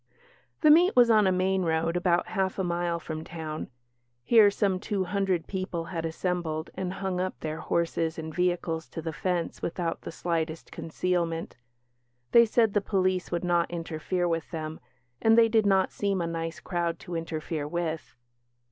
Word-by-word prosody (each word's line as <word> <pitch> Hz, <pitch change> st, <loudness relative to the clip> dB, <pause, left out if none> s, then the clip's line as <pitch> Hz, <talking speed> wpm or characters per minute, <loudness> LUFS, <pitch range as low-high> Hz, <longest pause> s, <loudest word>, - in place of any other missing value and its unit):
The 305 Hz, -, +7 dB
"meet" 350 Hz, +5 st, +6 dB
was 240 Hz, -2 st, +6 dB
on 215 Hz, -3 st, +5 dB
a -, -, +4 dB
main 190 Hz, +1 st, +1 dB
road, 165 Hz, 0 st, 0 dB
about 175 Hz, 0 st, +1 dB
half 190 Hz, -3 st, -1 dB
a 190 Hz, -, 0 dB
mile 175 Hz, -1 st, -1 dB
from 160 Hz, -1 st, -6 dB
town; 160 Hz, -2 st, -6 dB, 0.5 s
here 220 Hz, -, +6 dB
some 195 Hz, -2 st, 0 dB
two 200 Hz, -1 st, -1 dB
hundred 190 Hz, -2 st, 0 dB
people 185 Hz, -3 st, -3 dB
had 165 Hz, -1 st, -2 dB
assembled, 160 Hz, -2 st, -2 dB
and 185 Hz, -1 st, -3 dB
hung 190 Hz, -2 st, -2 dB
up 185 Hz, 0 st, -3 dB
their 155 Hz, 0 st, -4 dB
horses 165 Hz, -1 st, -1 dB
and 160 Hz, -1 st, -6 dB
vehicles 175 Hz, -2 st, -1 dB
to 165 Hz, -, -6 dB
the 160 Hz, 0 st, -3 dB
fence 175 Hz, 0 st, -2 dB
without 170 Hz, -1 st, -2 dB
the -, -, -7 dB
slightest 165 Hz, -1 st, -3 dB
concealment. 165 Hz, 0 st, -2 dB, 0.8 s
They 235 Hz, 0 st, +8 dB
said 220 Hz, -1 st, +3 dB
the 205 Hz, -, +2 dB
police 185 Hz, -2 st, 0 dB
would 175 Hz, 0 st, -1 dB
not 175 Hz, -1 st, +2 dB
interfere 175 Hz, +1 st, -2 dB
with 165 Hz, -2 st, -2 dB
them 160 Hz, -2 st, -5 dB, 0.4 s
and 225 Hz, 0 st, +5 dB
they 230 Hz, -1 st, +7 dB
did 220 Hz, -2 st, +3 dB
not 190 Hz, -1 st, +3 dB
seem 200 Hz, -2 st, -1 dB
a 170 Hz, -, 0 dB
nice 165 Hz, 0 st, -4 dB
crowd 170 Hz, -2 st, -2 dB
to 185 Hz, -4 st, -8 dB
interfere 160 Hz, -2 st, -3 dB
with. 165 Hz, 0 st, -3 dB
175 Hz, 175 wpm, -28 LUFS, 165-190 Hz, 0.8 s, They